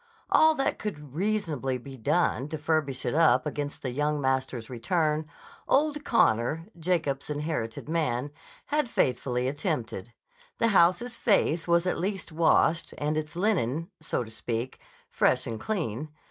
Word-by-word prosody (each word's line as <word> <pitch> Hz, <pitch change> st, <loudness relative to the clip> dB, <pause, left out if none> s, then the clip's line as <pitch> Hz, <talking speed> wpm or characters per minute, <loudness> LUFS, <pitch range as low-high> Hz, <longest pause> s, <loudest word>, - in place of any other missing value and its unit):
All 315 Hz, 0 st, +6 dB
that 270 Hz, -, 0 dB
could 150 Hz, -10 st, -6 dB
reasonably 160 Hz, -, -1 dB
be 135 Hz, +2 st, -10 dB
done 135 Hz, +2 st, +1 dB
to 155 Hz, -, -3 dB
furbish 150 Hz, -4 st, -1 dB
it -, -, 0 dB
up 140 Hz, -6 st, +4 dB
against 145 Hz, -1 st, -4 dB
the 130 Hz, -, -2 dB
young 150 Hz, +3 st, 0 dB
master's 130 Hz, -3 st, -1 dB
return, 155 Hz, +5 st, 0 dB, 0.4 s
old 295 Hz, +1 st, +2 dB
Connor, 145 Hz, -, +2 dB
Jacob's 160 Hz, -6 st, -1 dB
inherited 150 Hz, -7 st, -3 dB
man, 145 Hz, -4 st, -1 dB, 0.3 s
had 295 Hz, -4 st, 0 dB
faithfully 125 Hz, -, 0 dB
attempted: 130 Hz, -, -3 dB, 0.5 s
the 230 Hz, -, +3 dB
house's 190 Hz, +5 st, +3 dB
face 180 Hz, -8 st, +2 dB
was 170 Hz, +1 st, +3 dB
at 180 Hz, -, 0 dB
least 190 Hz, 0 st, -3 dB
washed, 165 Hz, +1 st, +2 dB
and 150 Hz, +1 st, -1 dB
its 155 Hz, +1 st, -3 dB
linen, 170 Hz, -, 0 dB
so -, -, -1 dB
to 110 Hz, -, -11 dB
speak, 115 Hz, +3 st, -3 dB, 0.3 s
fresh -, -, +2 dB
and 115 Hz, -1 st, -4 dB
clean. 155 Hz, -, -3 dB
150 Hz, 145 wpm, -28 LUFS, 130-175 Hz, 0.5 s, All